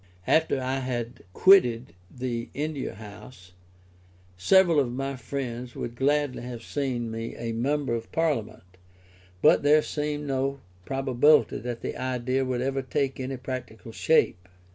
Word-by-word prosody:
After 160 -4 +2
I 130 +1 -1
had 120 -2 -4
quitted 125 - +5 0.2
the 120 -1 -4
India 145 -6 -3
House, 100 -2 -12 0.8
several 170 - +4
of 130 -4 0
my 135 +2 -3
friends 125 -1 -5
would 120 - -5
gladly 145 +1 +1
have 120 -1 -7
seen 125 -5 -2
me 115 0 -5
a 115 0 -4
member 135 +3 -1
of 115 -1 -4
Parliament; 140 -13 -1 0.8
but - - +6
there 150 +1 +5
seemed 150 0 -3
no 135 0 -1 0.3
probability 135 +2 +3
that 120 -1 -5
the - - -4
idea 130 +1 -1
would 130 -1 -2
ever 135 0 -1
take 135 +1 -2
any 130 0 -4
practical 125 -3 -7
shape. 95 - +1
130 Hz, 140 wpm, -26 LUFS, 120-140 Hz, 0.8 s, but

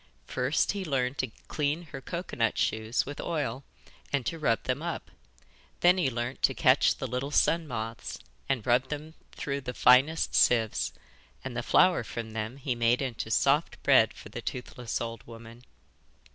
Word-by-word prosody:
First 125 +5 +1
he 200 -1 -4
learned 135 -4 -1
to 130 - -1 0.2
clean 150 +3 -1
her 135 - -7
cocoa 170 +6 -5
nut 115 -2 +1
shoes 110 +1 0
with 145 +1 -6
oil 140 -6 -2 0.5
and 140 -4 0
to 165 - -3
rub 115 -7 +1
them 130 +3 -1
up. 170 0 -5 0.7
Then 180 +1 +5
he 145 - +2
learnt 120 +1 -4
to 135 - +3
catch 130 +2 +4
the - - -5
little 125 +3 -3
sun 165 +2 +2
moths 115 -3 -5 0.3
and 130 -5 0
rub 125 +1 +2
them 150 +1 -5 0.2
through 140 -1 -3
the 125 -1 -6
finest 135 +6 +4
sieves, 115 -3 +3 0.5
and - - -5
the - - -1
flour - - +4
from 115 -1 -6
them 110 +3 -4
he 140 -2 -2
made 120 +2 +2
into 120 -4 -4
soft 140 +7 +2
bread - - +5
for - - -11
the - - -6
toothless 125 -2 -4
old 115 0 -5
woman. 115 +1 -12
130 Hz, 175 wpm, -29 LUFS, 115-145 Hz, 0.7 s, Then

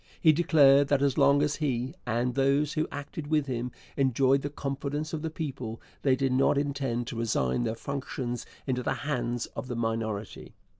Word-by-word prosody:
He 160 - +6
declared 145 -4 +5
that 140 -1 +2
as 140 -2 +2
long 140 0 +5
as 150 0 0
he, 130 -3 -1
and 120 +2 0
those 140 +3 +2
who 155 -1 0
acted 145 +1 -6
with 150 -2 +2
him, 125 -2 -3 0.2
enjoyed 135 0 +3
the 145 - -3
confidence 145 +2 -4
of 155 - -2
the 160 - -2
people, 135 -8 -5 0.2
they 135 -2 +3
did 135 0 0
not 135 +2 +3
intend 140 -4 -1
to 115 - -6
resign 110 - 0
their 110 0 -1
functions 130 -1 -4 0.2
into 125 -2 -1
the - - 0
hands 120 -4 -1
of 130 - -5
the 125 - -4
minority. 110 -2 -3
135 Hz, 185 wpm, -28 LUFS, 120-145 Hz, 0.2 s, He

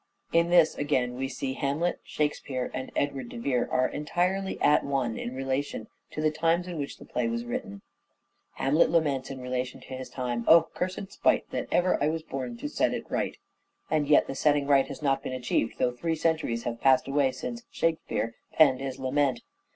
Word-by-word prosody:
In 170 +1 +4
this 170 -2 +5
again 130 -4 +1
we 130 +2 -3
see 130 0 -3
Hamlet, 145 +6 -1
" - - -44
Shakespeare 140 -4 -2
" - - -24
and 130 - -5
Edward 135 -4 -1
de - - -8
Vere 125 +1 0
are 130 0 +3
entirely 180 +6 -1
at 150 - +4
one 135 -5 -1
in 125 - -5
relation 135 -3 -2 0.2
to 155 - -5
the 155 - +3
times 165 +3 +1
in 175 -3 -5
which 140 - -4
the - - -13
play 120 -1 -1
was 115 +1 -2
written. 100 -4 -5 0.7
Hamlet 145 +5 +3
laments 145 -6 +1
in 135 -1 -6
relation 125 0 -3
to - - -10
his 130 0 -6
time 120 -2 -3
" - - -22
O, 165 0 +8
cursed 185 +2 -3
spite - - +1
that - - -3
ever 180 -4 +2
I - - +3
was 160 0 -3
born 130 -5 -5
to - - -4
set - - +1
it - - -7
right." - - -1 0.5
And 155 -2 +2
yet 150 - +5
the - - -5
setting 145 0 +2
right 140 -1 +4
has 140 +1 -8
not 135 -1 +2
been - - -5
achieved 125 -2 -1
though 125 - +2
three 160 +7 -2
centuries 155 -8 0
have 115 -1 -4
passed 135 -1 +4
away 140 -1 +2
since 240 - -6
" - - -50
Shakespeare 115 -9 -1
" - - -46
penned 140 -5 +6
this 135 -1 -4
lament. 135 -1 0
135 Hz, 215 wpm, -28 LUFS, 130-155 Hz, 0.7 s, O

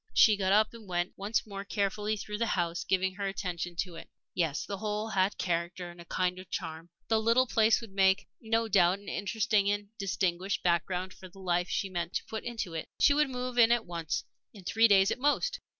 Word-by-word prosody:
She 215 - +7
got 190 -2 0
up 215 +2 +4
and 225 -3 -12
went 175 0 -1
once 205 +3 -1
more 200 -2 -6
carefully 205 +1 -1
through 210 +1 -5
the 230 - +1
house, 170 -1 -1
giving 190 0 +1
her 200 +1 -3
attention 180 -3 -4
to 180 -3 -6
it. - - -11 0.2
Yes, 160 -5 -1
the 200 -1 -5
whole 215 0 -2
had 195 -1 +1
character 175 0 -2
and 175 0 -13
a - - -12
kind 180 +1 -1
of 185 - -11
charm. 165 -1 -5 0.2
The 225 -1 +3
little 230 +3 +4
place 220 -2 +3
would 225 -3 -10
make, 190 +1 +3
no 225 0 +1
doubt, 185 -3 +4
an 200 - -17
interesting 205 0 +1
and 205 0 -2
distinguished 190 0 -1
background 180 +2 0
for 185 - -12
the 180 - -19
life 180 -1 0
she 195 - -1
meant 175 -2 -4
to - - -1
put 220 - -5
into 225 -7 -4
it. 160 - -4
She 285 - +6
would 300 0 +2
move 250 -1 -3
in 230 0 +7
at 240 -1 +2
once 170 -3 -3 0.3
in 195 - -12
three 225 +5 +4
days 195 -2 +5
at - - -2
most. 290 - +1
195 Hz, 220 wpm, -30 LUFS, 180-220 Hz, 0.3 s, She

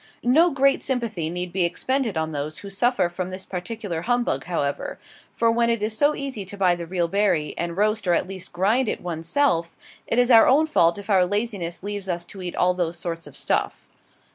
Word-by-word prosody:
No 310 +9 +5
great 275 -2 +2
sympathy 225 - -2
need 180 +1 -4
be 190 -1 +2
expended 225 +4 -1
on 160 0 -1
those 150 +1 -4
who 200 - -9
suffer 240 -1 +2
from 180 +1 -5
this 185 +1 -7
particular 180 -2 -4
humbug, 245 +5 0
however; 145 -5 -2 0.4
for 230 0 +3
when 235 0 +2
it 230 -3 0
is 215 0 -1
so 290 +5 +3
easy 270 -7 -4
to 200 +2 -8
buy 185 -3 +4
the 170 -1 -5
real 175 -1 0
berry, 190 -5 +1
and 170 0 -3
roast 215 0 +1
or 175 - +4
at - - 0
least 190 -1 -9
grind 215 +7 +1
it - - -3
one's 165 -2 -5
self, 170 -13 +1 0.3
it 230 - 0
is 245 +1 +4
our 225 -1 +8
own 295 +4 +5
fault 170 - +3
if 200 +1 -6
our 190 -2 +5
laziness 200 -3 -2
leaves 205 -1 -5
us 175 -1 -2
to 190 +2 -10
eat 180 -1 -4
all 180 0 +3
those 175 -1 -2
sorts 165 -2 -5
of 145 - -9
stuff. - - -1
190 Hz, 215 wpm, -24 LUFS, 175-230 Hz, 0.4 s, our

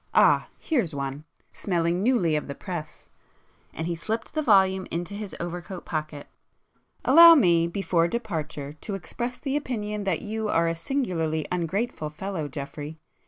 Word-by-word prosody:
Ah—here's 230 - +2
one—smelling 165 +5 -3
newly 210 -9 +2
of 150 - -2
the 140 - -5
press," 165 -4 -7 0.6
and 160 - -5
he 170 - -1
slipped 220 +7 -4
the 310 - 0
volume 190 -7 +4
into 175 +4 -3
his 205 -1 -6
overcoat 175 +2 -6
pocket; 155 -2 -4 0.8
"Allow 335 +5 +10
me, 170 - +4
before 170 -2 +1
departure, 160 -9 -4
to 195 +6 -6
express 240 +6 -5
the 275 -1 -3
opinion 210 -7 -2
that 185 -5 0
you 220 +1 -3
are 165 -3 +3
a 165 - +1
singularly 165 - -1
ungrateful 180 0 -2
fellow, 165 0 -4
Geoffrey! 145 +2 -7
175 Hz, 140 wpm, -26 LUFS, 160-215 Hz, 0.8 s, Allow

